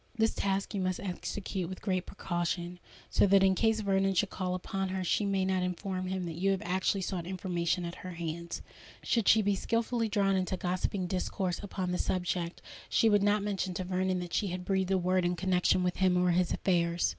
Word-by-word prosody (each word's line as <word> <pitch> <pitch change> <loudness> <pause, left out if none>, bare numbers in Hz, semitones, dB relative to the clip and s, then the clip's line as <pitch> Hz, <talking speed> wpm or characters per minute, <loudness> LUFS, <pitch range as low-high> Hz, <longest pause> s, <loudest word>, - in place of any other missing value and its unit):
This 225 0 +2
task 195 +1 -1
you 200 - -1
must 185 -1 -1
execute 190 -1 -4
with 185 - -6
great 185 -3 -1
precaution, 175 0 -3 0.3
so - - +4
that 195 0 +5
in 190 0 +5
case 220 +2 +2
Vernon 195 -1 +1
should 200 +2 +1
call 185 -1 -2
upon 190 +1 -3
her 190 0 -2
she 200 +3 +1
may 195 -1 +1
not 190 -1 +1
inform 185 +1 -3
him 190 0 -2
that 165 -1 -5
you 195 - +3
have 195 -1 +1
actually 190 +2 +1
sought 175 -2 -3
information 180 -1 -1
at 170 - -5
her 185 -1 -6
hands. 170 0 -5 0.4
Should 230 -5 +1
she 220 -1 +6
be 200 0 +2
skilfully 230 +2 0
drawn 200 -1 +2
into 185 0 0
gossiping 185 +1 -1
discourse 180 0 -2
upon 190 -3 -3
the 180 - -1
subject, 175 -1 -2 0.3
she 225 - +4
would 205 -1 +4
not 205 0 +2
mention 195 -3 -2
to 185 - -2
Vernon 185 0 0
that 175 -1 -7
she 205 - +1
had 180 0 -4
breathed 190 -1 +1
a 190 - +3
word 185 0 +1
in 175 0 +1
connexion 180 0 +2
with 180 0 0
him 185 -1 +3
or 180 0 +3
his 180 0 +2
affairs. 170 -2 +1
185 Hz, 215 wpm, -31 LUFS, 180-195 Hz, 0.4 s, she